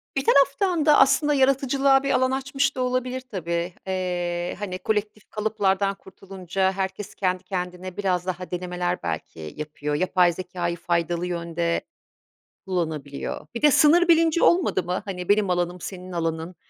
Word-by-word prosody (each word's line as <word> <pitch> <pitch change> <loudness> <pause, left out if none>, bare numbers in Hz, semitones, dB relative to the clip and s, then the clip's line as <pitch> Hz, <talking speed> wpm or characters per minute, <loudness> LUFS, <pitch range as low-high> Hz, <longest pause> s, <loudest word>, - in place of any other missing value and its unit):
Bir 270 - 0
taraftan 295 +4 +3
da 300 -1 +6
aslında 290 +2 +4
yaratıcılığa 270 0 +3
bir 275 - 0
alan 260 0 +2
açmış 270 +1 0
da 260 - -2
olabilir 255 0 -1
tabii. 170 -2 -2
Eee, 175 -2 -2
hani 185 -3 -4
kolektif 210 0 -2
kalıplardan 200 -2 0
kurtulunca 190 -1 -3
herkes 190 +1 -4
kendi 185 -1 -1
kendine 180 -1 -5
biraz 185 -3 0
daha 180 -1 -5
denemeler 180 0 -3
belki 80 -1 -5
yapıyor. 150 -1 -4
Yapay 180 +1 +3
zekâyı 175 -1 -4
faydalı 170 0 -1
yönde 170 -1 -2 0.8
kullanabiliyor. 160 -6 -4
Bir 235 - -3
de 300 0 +6
sınır 335 +5 +5
bilinci 330 0 +4
olmadı 345 - +3
mı? 180 +2 -2
Hani 180 -3 -6
benim 205 -1 +3
alanım 175 0 -1
senin 185 0 -7
alanın 165 0 -3
185 Hz, 145 wpm, -24 LUFS, 175-255 Hz, 0.8 s, da